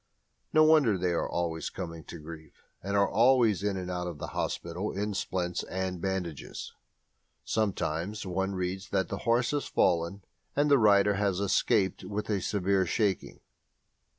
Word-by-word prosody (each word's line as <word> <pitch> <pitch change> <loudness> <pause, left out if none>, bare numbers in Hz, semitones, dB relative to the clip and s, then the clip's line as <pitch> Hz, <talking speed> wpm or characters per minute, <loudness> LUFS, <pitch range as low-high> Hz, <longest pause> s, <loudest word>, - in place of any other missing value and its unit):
No 155 - +6
wonder 150 -10 +5
they 90 0 0
are 85 - -1
always 85 -2 -2
coming 85 -4 -7
to - - -8
grief, 80 -1 -11 0.2
and 100 +1 -1
are 100 0 +4
always 115 -3 +4
in 100 -1 -1
and 90 -1 -4
out 90 0 -3
of 85 -4 -6
hospital 85 +7 -3
in 105 +2 -2
splints 90 -2 -2
and 95 -1 -3
bandages. 90 -5 -4 0.7
Sometimes 100 -2 -1
one 95 +1 -1
reads 95 +1 -3
that 95 -1 0
a 100 - -2
horse 120 +4 +1
has 145 -1 -1
fallen 85 +3 +1 0.3
and 145 +1 +2
the 140 - +6
rider 105 -2 +5
has 100 -2 +1
"escaped 100 -1 +1
with 105 +1 -4
a 100 -2 0
severe 95 -1 +1
shaking." 100 0 -1
95 Hz, 155 wpm, -29 LUFS, 90-105 Hz, 0.7 s, No